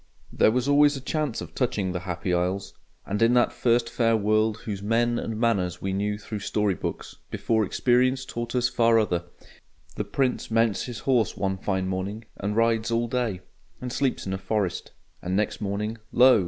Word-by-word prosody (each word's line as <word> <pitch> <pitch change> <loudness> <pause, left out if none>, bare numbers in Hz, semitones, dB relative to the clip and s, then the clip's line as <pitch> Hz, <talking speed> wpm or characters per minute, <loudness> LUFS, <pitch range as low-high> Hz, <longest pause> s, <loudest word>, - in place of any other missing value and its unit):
There - - +4
was 125 +3 0
always 145 0 +5
a - - -5
chance 145 -2 -2
of - - -8
touching 110 -7 -1
the 90 - -2
Happy 90 +1 -3
Isles. 90 +3 -1 0.3
And 105 +3 -2
in 115 +2 +5
that 120 - +3
first 120 -1 +2
fair 115 -2 +2
world 110 +1 +2
whose 100 -3 -5
men 120 +3 +1
and 110 -1 -4
manners 95 -7 +1
we 95 0 -2
knew 105 +1 -1
through 105 0 -6
story 100 0 0
books, - - -5
before 110 -1 +1
experience 130 +5 +2
taught 120 0 -5
us 125 0 +3
far 115 -1 +3
other, 90 -6 +1 0.7
the - - 0
Prince 130 -2 -1
mounts 115 -2 +2
his 120 -3 -6
horse 120 -7 +1
one 95 -1 0
fine 95 -1 -1
morning, 95 +4 -3
and 105 +1 -2
rides 115 0 +2
all 115 0 +1
day, 115 -7 -1 0.4
and 125 -1 -5
sleeps 135 -3 0
in 95 - -2
a 95 - -3
forest; 95 -2 -2 0.3
and 90 +1 -2
next 105 +2 -1
morning, 105 +3 -2
lo! 125 -2 +6
110 Hz, 190 wpm, -26 LUFS, 100-120 Hz, 0.7 s, lo